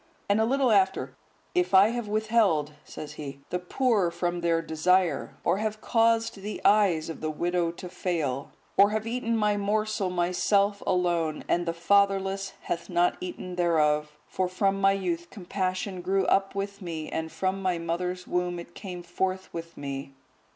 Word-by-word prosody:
And 205 +2 +3
a - - +3
little 265 0 +2
after: 190 -2 +2 0.4
"If 360 - +2
I 195 +3 +8
have 240 -2 -3
withheld," 210 -8 +2
says 150 -1 -8
he, 140 -2 -8
"the 180 - 0
poor 205 0 +1
from 175 0 -2
their 170 -1 +2
desire; 165 0 +1
or 180 +3 +2
have 215 0 -2
caused 225 -1 +2
the 205 +2 -5
eyes 195 -7 +4
of 165 - -7
the 155 - -1
widow 175 +2 0
to 180 - -8
fail; 155 -7 -2 0.3
or 200 +1 +7
have 215 0 -2
eaten 230 0 -1
my 210 -1 +2
morsel 210 -1 0
myself 195 +3 +1
alone, 175 -4 +1
and 175 0 +1
the - - +2
fatherless 195 +2 +2
hath 170 - -4
not 175 0 +2
eaten 180 0 -6
thereof: 150 -3 +2
(for 185 -1 -1
from 195 +2 0
my 195 0 +5
youth 175 -3 -2
compassion 185 -1 -3
grew 190 +1 +1
up 195 0 +2
with 200 0 -4
me, 160 -4 -5
and 160 0 -4
from 190 +1 -1
my 185 -2 0
mother's 180 +2 -3
womb 180 0 -1
it 170 0 -9
came 180 -3 -7
forth 185 +2 -2
with 165 0 -7
me." 140 -1 -5
185 Hz, 170 wpm, -27 LUFS, 170-200 Hz, 0.4 s, I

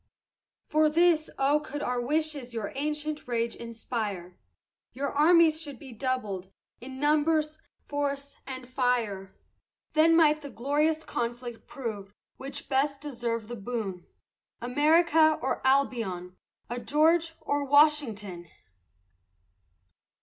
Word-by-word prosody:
For 310 0 +3
this, 330 0 +3
oh 280 +2 +3
could 290 0 -6
our 245 0 -1
wishes 290 -2 -2
your 215 -3 -3
ancient 300 +1 -3
rage 235 -1 -1
inspire, 220 -6 -5 0.6
Your 280 +2 -2
armies 320 +1 +5
should 285 -5 -7
be 265 +2 -11
doubled, 215 -7 -3 0.3
in 260 +2 -9
numbers, 305 +1 +2 0.3
force, 280 -1 -3
and 255 -2 -6
fire. 240 -7 -1 0.6
Then 320 +1 +5
might 305 -2 +4
the 285 - -8
glorious 295 +6 0
conflict 240 -1 -4
prove 220 -8 -6 0.2
which 275 +2 -7
best 280 +1 +1
deserved 235 -6 -3
the 240 - -6
boon, 200 -4 -5 0.5
America 310 +4 +4
or 265 - -2
Albion, 225 -10 0 0.3
a 240 +1 -4
George 325 +5 +2
or 285 0 -1
Washington! 265 - +2
275 Hz, 115 wpm, -28 LUFS, 235-300 Hz, 0.6 s, armies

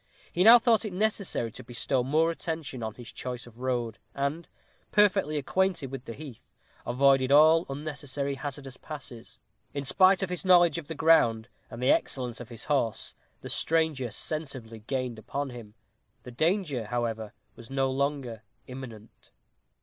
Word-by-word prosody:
He 180 - +2
now 230 +4 +10
thought 235 -2 +3
it 210 -4 -5
necessary 200 - -1
to - - -10
bestow 125 +1 -1
more 155 +5 +2
attention 160 -6 -5
on 110 -1 -4
his 120 -2 -10
choice 125 -1 -5
of 120 0 -16
road, 120 -3 -2 0.2
and, 140 +4 -2 0.4
perfectly 195 -7 +3
acquainted 170 -1 0
with 135 -1 -7
the 115 - -6
heath, 140 -6 -11 0.4
avoided 135 +1 +3
all 155 +3 +6
unnecessary 140 -1 -4
hazardous 135 -1 -7
passes. 130 -6 -10 0.4
In 140 0 -3
spite 185 +7 +4
of 185 - -3
his 180 - -2
knowledge 175 -4 +5
of 155 - -11
the 160 - -5
ground, 125 -8 +4 0.2
and 120 +2 -7
the 130 - +5
excellence 125 -3 -1
of 120 - -9
his 115 -1 -9
horse, 135 -7 -1 0.3
the - - -8
stranger 160 -6 +1
sensibly 130 -4 -5
gained 125 0 -3
upon 140 +4 -4
him. 115 -3 -11 0.5
The 125 - -9
danger, 155 - 0
however, 115 -1 -3 0.2
was 115 - -13
no 135 0 0
longer 135 -4 -2 0.2
imminent. 120 -4 -11
135 Hz, 155 wpm, -28 LUFS, 120-160 Hz, 0.5 s, now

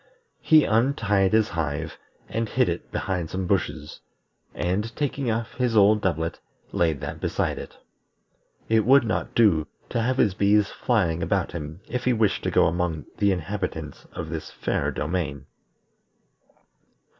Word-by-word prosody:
He 155 -2 +6
untied 110 -5 +2
his 110 -1 +3
hive, 75 -3 -3 0.3
and 115 -1 -2
hid - - +2
it - - -5
behind 90 -4 -2
some 95 0 -3
bushes, 80 -5 -2 0.6
and 105 +6 -1
taking 140 -3 -1
off 115 +1 -2
his 125 -3 0
old 105 +1 +5
doublet, 80 -3 -1 0.3
laid 80 -5 +1
that - - -5
beside - - -1
it. - - -10 0.9
It 110 -1 +3
would 130 +3 +6
not 110 -2 -2
do 90 -10 +4 0.2
to 115 - 0
have 130 +3 0
his 105 -7 +3
bees 100 +1 +3
flying 85 -1 0
about - - 0
him 80 +1 -7
if 125 +1 -3
he 125 - +3
wished 110 -3 +1
to - - +2
go - - +4
among 85 -3 -1
the 100 -1 +4
inhabitants 90 -4 -4
of 80 - -5
this 80 -1 -5
fair - - -1
domain. 75 -3 -3
100 Hz, 150 wpm, -25 LUFS, 80-115 Hz, 0.9 s, He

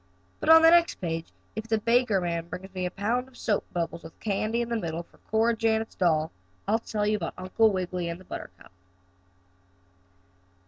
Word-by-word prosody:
But - - -2
on 325 0 +9
the 325 - +8
next 340 0 +5
page, 165 -2 -3 0.3
if 220 +1 -5
the 220 0 +2
baker 230 -2 +3
man 170 -2 -2
brings 190 +2 -8
me 185 -1 -2
a - - -3
pound 230 +7 -1
of 265 - -18
soap 210 -3 0
bubbles 170 -1 -3
with 160 - -13
candy 215 +2 -1
in 235 - -3
the 235 - 0
middle 170 -5 -3
for - - -26
Cora 225 +2 +3
Janet's 220 0 0
doll, 160 -3 +1 0.4
I'll 220 +3 +3
tell 210 -2 -2
you 210 0 +2
about 170 -4 -5
Uncle 185 +4 +2
Wiggily 180 -2 -2
and 170 +1 -5
the - - -14
buttercup. - - -9
205 Hz, 190 wpm, -27 LUFS, 175-225 Hz, 0.4 s, on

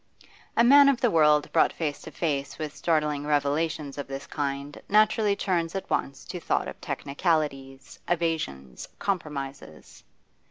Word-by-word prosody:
A 235 - +6
man 280 +3 +8
of 270 -3 +1
the 245 -5 +2
world 150 -2 +4
brought - - +4
face 150 -3 -3
to - - -9
face 140 -4 -2
with 155 -1 -5
startling 150 -1 0
revelations 145 0 0
of 145 - -5
this 135 +1 -6
kind 140 0 -4
naturally 210 0 +3
turns 175 -3 -1
at 195 - -5
once 135 0 -2
to 180 0 -6
thought - - -1
of - - -9
technicalities, 140 -3 -2
evasions, 160 - -2
compromises. 140 - -5
150 Hz, 145 wpm, -26 LUFS, 140-175 Hz, -, man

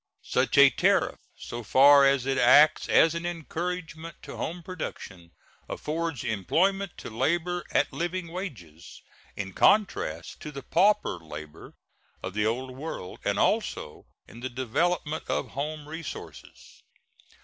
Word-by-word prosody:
Such - - 0
a - - +8
tariff, - - +2 0.2
so 120 - -7
far 140 +4 +6
as 135 -2 +2
it 135 -1 0
acts 145 +5 +6
as 160 - +5
an 170 0 -4
encouragement 170 -1 -5
to - - -8
home 170 +2 -5
production, 95 - -7 0.4
affords 160 -3 -3
employment 175 - 0
to - - -8
labor 170 +9 0
at - - +1
living 175 0 -3
wages, 110 - -8 0.3
in 95 -2 -5
contrast 90 - +1
to 150 - -7
the 140 -2 -8
pauper 195 - +2
labor 75 -1 -10 0.5
of 95 - -5
the 105 +1 +1
Old 130 +3 -2
World, 135 - -7
and - - 0
also 75 - -1 0.2
in 115 - -13
the 130 +2 -4
development 150 +6 -1
of - - -1
home 150 +1 -5
resources. 160 0 -9
150 Hz, 135 wpm, -27 LUFS, 115-170 Hz, 0.5 s, a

